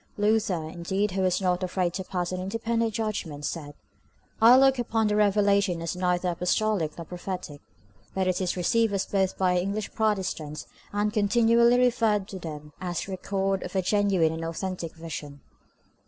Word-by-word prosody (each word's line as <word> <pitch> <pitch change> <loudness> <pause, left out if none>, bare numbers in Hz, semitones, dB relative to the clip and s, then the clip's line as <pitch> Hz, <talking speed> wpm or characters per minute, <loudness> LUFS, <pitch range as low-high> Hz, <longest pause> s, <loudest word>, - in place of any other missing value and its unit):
Luther, 210 -5 +1
indeed, 190 +5 -2
who 190 +1 -1
was 185 -1 +2
not 180 -1 0
afraid 180 -1 -1
to 190 0 -3
pass 180 -1 -3
an 185 0 -3
independent 225 +3 -1
judgment, 200 -10 -3
said, 145 -3 -5 0.7
"I 235 +3 +8
look 270 -1 +5
upon 225 -2 0
the 210 - +1
revelation 200 -3 +3
as 165 +1 -3
neither 180 0 0
apostolic 180 -1 0
nor 170 - -6
prophetic;" 180 -4 -6 0.5
but 190 -1 +1
it 185 0 0
is 185 0 -1
received 225 +4 +2
as 195 - 0
both 190 -2 0
by 185 -1 +2
our 180 - +2
English 200 +3 -3
Protestants, 185 -8 -1 0.3
and 210 +1 0
continually 235 +3 +4
referred 230 -5 +2
to 195 - -6
by 165 - -6
them 150 0 -9
as 175 -2 -2
the 195 - -8
record 195 0 -1
of 180 - -7
a 190 - +1
genuine 190 -4 +2
and 165 0 -5
authentic 170 0 -4
vision. 150 -3 -7
190 Hz, 175 wpm, -27 LUFS, 175-210 Hz, 0.7 s, I